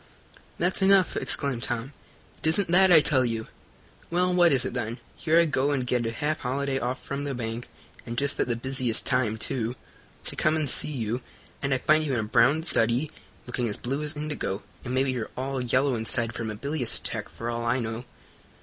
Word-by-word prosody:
"That's 180 +3 0
enough!" 190 -1 +4
exclaimed 135 -5 +2
Tom. 120 +4 -3 0.5
"It - - 0
isn't 170 +2 +2
that, 190 +1 +6
I 160 -3 +9
tell 135 -3 +3
you." 115 -2 -2 0.6
"Well, 180 +1 +2
what 175 -1 +5
is 130 -3 +3
it - - -3
then? 120 -1 -3 0.2
Here 165 0 +3
I 170 - +5
go 145 -2 +1
and 135 -3 0
get 125 -2 0
a - - -1
half 150 +7 -2
holiday 135 +1 -1
off 125 +1 -3
from 140 +1 -3
the 140 -2 -3
bank, 115 0 -4 0.4
and 120 0 -6
just 140 +1 0
at - - +2
the 120 - 0
busiest 130 -1 -1
time, 120 -4 +1
too, 115 +1 -2 0.5
to - - -3
come 155 +1 +2
and 155 -2 0
see 135 - +2
you, 120 -2 -2 0.4
and 140 - -1
I 130 - +3
find 155 +4 +3
you 145 -3 -1
in 120 - +1
a - - -1
brown 120 +8 +3
study, 125 0 0 0.3
looking 125 -1 -2
as 105 - -3
blue 135 +4 -2
as 150 +1 -3
indigo, 150 -9 -3 0.2
and 125 0 -3
maybe 130 0 +2
you're 120 -4 -3
all 135 0 -2
yellow 130 +3 +2
inside 115 0 +1
from 115 -1 -4
a 105 - -4
bilious 140 +2 0
attack, - - -4
for 115 +1 -5
all 115 0 -3
I 120 +2 +1
know." 115 +1 -4
130 Hz, 215 wpm, -26 LUFS, 120-150 Hz, 0.6 s, I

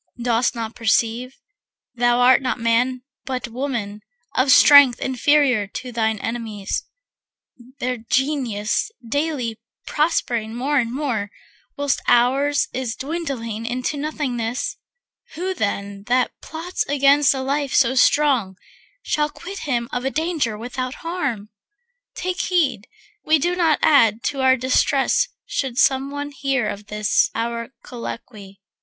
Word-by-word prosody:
Dost 240 0 +1
not 225 -1 -4
perceive, 230 +3 0 0.6
thou 240 0 +2
art 255 +1 +6
not 255 -1 -2
man 245 +2 +1 0.2
but 255 -2 -4
woman, 230 -5 -4 0.3
Of 255 +2 +2
strength 280 -2 +8
inferior 260 -4 +2
to 250 +5 -7
thine 220 -2 0
enemies, 220 -3 -4 0.9
Their 250 -1 -2
Genius 240 - -1 0.2
daily 265 -5 -2 0.3
prospering 240 -8 -1
more 280 +4 +1
and 230 -2 -1
more, 245 -7 -2 0.5
Whilst 285 -1 0
ours 275 +4 +3
is 250 -3 -3
dwindling 265 -8 -4
into 250 +4 -2
nothingness? 265 -4 -3 0.6
Who 370 +4 -2
then 200 - -3
that 250 0 +2
plots 330 +3 -4
against 280 0 +4
a 265 - -3
life 280 +1 -1
so 260 -2 +4
strong 260 -7 +3 0.5
Shall 300 0 0
quit 390 +6 -9
him 240 -2 0
of 245 - -1
the 265 - -1
danger 305 -8 -1
without 255 +3 -5
harm? 280 - -3 0.7
Take 365 0 -2
heed 270 - 0 0.4
we 315 +1 +4
do 350 +5 0
not 330 -4 +3
add 230 -7 +4
to 275 -2 -2
our 260 0 +4
distress 260 +2 +2 0.2
Should 260 -3 -3
some 270 +1 +3
one 285 0 -5
hear 270 -5 -1
of 205 0 -6
this 210 -1 +1
our 230 0 -3
colloquy. 215 -4 -9
255 Hz, 130 wpm, -21 LUFS, 230-285 Hz, 0.9 s, strength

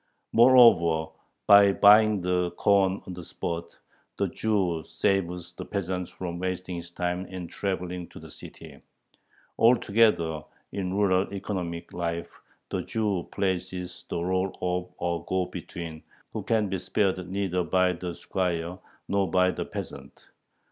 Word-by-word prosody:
Moreover, 90 -10 +6 0.3
by 100 -1 +7
buying 105 0 +6
the 90 -1 +1
corn 95 +2 +2
on 95 - -7
the 90 -1 -8
spot, 85 0 -5 0.4
the 100 - +1
Jew 90 -5 0
saves 90 -2 -1
the - - -7
peasant 90 -2 -3
from 85 -1 -6
wasting 90 -1 -3
his 85 0 -7
time 90 +1 -3
in 90 -1 -6
traveling 90 -2 -4
to - - -12
the - - -12
city. - - -12 0.8
Altogether 105 -9 +3 0.3
in 95 -2 -3
rural 95 -2 +2
economic 90 -4 -4
life 85 -1 -4 0.3
the - - -1
Jew 105 -5 -2
plays 95 -2 -1
the 90 -1 -7
rôle 95 +2 -1
of 90 0 -2
a 85 -1 -2
go 95 +1 0
between, 80 -3 -7 0.3
who - - -3
can 110 -2 +1
be 95 -1 -2
spared 90 0 0
neither 95 -2 -1
by 90 +1 +2
the 90 0 -5
squire 90 -1 -2 0.3
nor 100 -2 +1
by 90 +1 +3
the - - -4
peasant. - - -9
90 Hz, 140 wpm, -27 LUFS, 85-100 Hz, 0.8 s, by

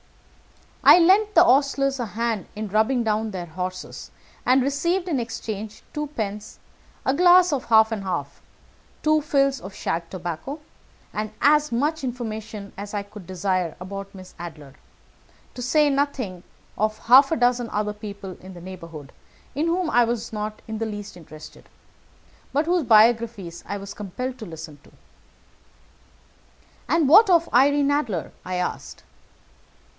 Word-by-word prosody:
I - - +9
lent 395 +5 +4
the 340 - +8
hostlers 275 -2 +2
a 240 - -2
hand 225 -3 -2
in 215 +1 -4
rubbing 220 +5 +1
down 220 0 0
their 185 -4 -5
horses, 180 +2 -6 0.4
and 255 +2 +5
I - - +1
received 340 +7 0
in 300 -7 0
exchange 220 -2 -6
two 300 -1 -3
pence, 210 -6 -5 0.5
a 265 - +2
glass 355 +1 +6
of 270 - -2
half 220 -1 +5
and 220 -2 -2
half, 145 -7 -4 0.6
two 310 0 +3
fills 275 -2 +1
of 190 +1 -9
shag 165 0 -3
tobacco, 180 - -5 0.5
and 215 +1 -3
as 300 0 +4
much 295 +6 0
information 220 -4 -5
as 205 +1 -6
I 205 - -2
could 200 -3 -13
desire 185 -2 -1
about 195 +2 -7
Miss 185 -1 -12
Adler, 150 -5 -9 0.8
to 250 - -8
say 300 +5 +3
nothing 270 -10 -2 0.4
of 215 +1 0
half 265 +6 +6
a - - +3
dozen 245 -3 +1
other 210 0 -2
people 200 -3 -8
in 185 0 -11
the - - -10
neighbourhood, 165 -6 -10 0.4
in 305 +4 -1
whom 350 +1 0
I 245 - +5
was 235 -1 -3
not 215 0 -5
in 220 -1 -5
the 225 - -2
least 205 -2 -7
interested, 155 -3 -13 0.8
but 295 +3 +1
whose 350 0 +1
biographies 220 -5 +3
I 205 - -3
was 200 0 -8
compelled 250 +6 -6
to 220 - -7
listen 160 -3 -9
to." - - -20 2.0
"And 330 -4 +3
what 395 +8 +7
of 335 -2 +3
Irene 285 +3 +4
Adler?" 235 - -1
I 185 - -4
asked. 180 0 -4
220 Hz, 155 wpm, -23 LUFS, 195-275 Hz, 2.0 s, I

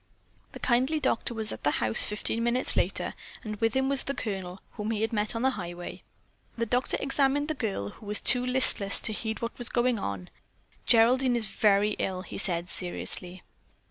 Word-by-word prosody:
The - - -8
kindly 260 +5 +2
doctor 235 -4 0
was 220 -1 +3
at - - -8
the 145 - +3
house 110 0 +4
fifteen 215 +2 -1
minutes 240 +2 +2
later - - 0 0.3
and 215 -1 -5
with 225 +2 0
him 265 0 +2
was 275 -1 0
the 275 - -3
Colonel, 190 -6 -4
whom 210 -1 -5
he 220 -2 -1
had 225 - -1
met 210 +1 -1
on 230 - -2
the 265 - +3
highway. 175 -5 -7 0.6
The 230 - 0
doctor 245 +3 0
examined 280 +1 +1
the - - +1
girl, 200 - -3
who 210 - -13
was 210 0 +2
too 250 -1 +3
listless 250 -6 +3
to 215 - +1
heed 220 +1 -4
what 230 - -3
was 245 - -3
going 240 -2 +1
on. 100 - -5 0.6
"Geraldine 245 +2 +5
is 235 -2 +1
very 210 -1 +2
ill," 185 -1 -2
he - - -7
said 175 -3 -1
seriously. 180 0 -5
225 Hz, 195 wpm, -28 LUFS, 200-250 Hz, 0.6 s, Geraldine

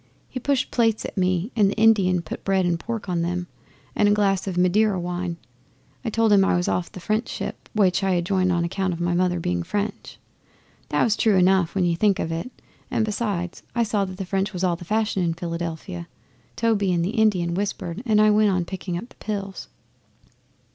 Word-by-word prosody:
He 255 - -6
pushed 275 +1 0
plates 225 -3 +1
at - - -6
me 185 +2 0
and 205 -4 +4
the - - -3
Indian 195 -6 +4
put - - -7
bread 190 -1 +2
and 170 -1 0
pork 225 +1 -5
on 175 -2 0
them, 175 +1 -2 0.5
and 205 - +4
a - - +4
glass 200 -2 +1
of 185 -2 -3
Madeira 190 +2 +3
wine. 175 0 -3 0.7
I 235 - -1
told 225 -1 +3
him 195 -1 +6
I 195 - +2
was 175 0 0
off 180 - -1
the - - -9
French 215 +6 -1
ship, - - -6
which 195 -3 +2
I 190 -1 +2
had 175 -1 0
joined 185 -1 +2
on 170 -1 +1
account 185 +2 -1
of 165 - -6
my 175 0 0
mother 180 0 +1
being 90 - -1
French. 205 - -4 0.7
That - - +2
was 220 -2 +2
true 220 -3 +3
enough 185 -1 +3
when 185 -2 +2
you 170 -1 +2
think 200 +2 +2
of 165 - -2
it, 165 +9 -3 0.4
and 220 - +1
besides 205 -5 -3
I 235 - +3
saw 210 -2 0
that 185 -1 -8
the 195 - -4
French 195 +2 -1
was 180 0 -3
all 180 -2 +2
the 175 - -10
fashion 215 0 0
in 165 -2 0
Philadelphia. 165 - -5 0.5
Toby 215 -4 +1
and 170 -1 +1
the 190 - -1
Indian 205 -7 +2
whispered 195 -1 -3
and 215 -4 +3
I 215 0 +6
went 210 0 +4
on 185 -3 0
picking 180 -1 -4
up 235 +8 -7
the - - -20
pills. 200 -2 -5
190 Hz, 215 wpm, -24 LUFS, 175-210 Hz, 0.7 s, him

